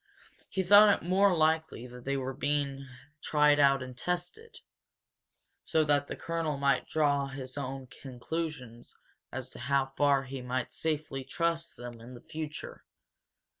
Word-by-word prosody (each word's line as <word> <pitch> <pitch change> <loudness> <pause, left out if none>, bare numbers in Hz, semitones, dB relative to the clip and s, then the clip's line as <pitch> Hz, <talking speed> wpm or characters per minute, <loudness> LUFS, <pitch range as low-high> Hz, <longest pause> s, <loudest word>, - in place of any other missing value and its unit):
He 190 - -1
thought 205 +3 +7
it - - -7
more 190 0 +4
likely 160 -5 +1
that 125 0 -11
they 140 0 0
were 135 0 -3
being 140 0 -1 0.3
tried 150 -1 +4
out 135 -2 +4
and 130 -1 -9
tested, 180 - -4 1.1
so 160 - +2
that 145 -1 +2
the - - -5
colonel 165 -3 -2
might 140 0 +1
draw 145 -3 +1
his 135 -1 -7
own 135 -1 -5
conclusions 130 -1 -6 0.4
as 130 0 -5
to - - -11
how 135 +1 0
far 140 -2 +3
he 135 0 -6
might 125 0 -3
safely 155 -4 -2
trust 165 +4 -2
them 120 -1 -9
in 125 +2 -10
the 120 - -12
future. 155 -1 -7
140 Hz, 150 wpm, -30 LUFS, 130-160 Hz, 1.1 s, thought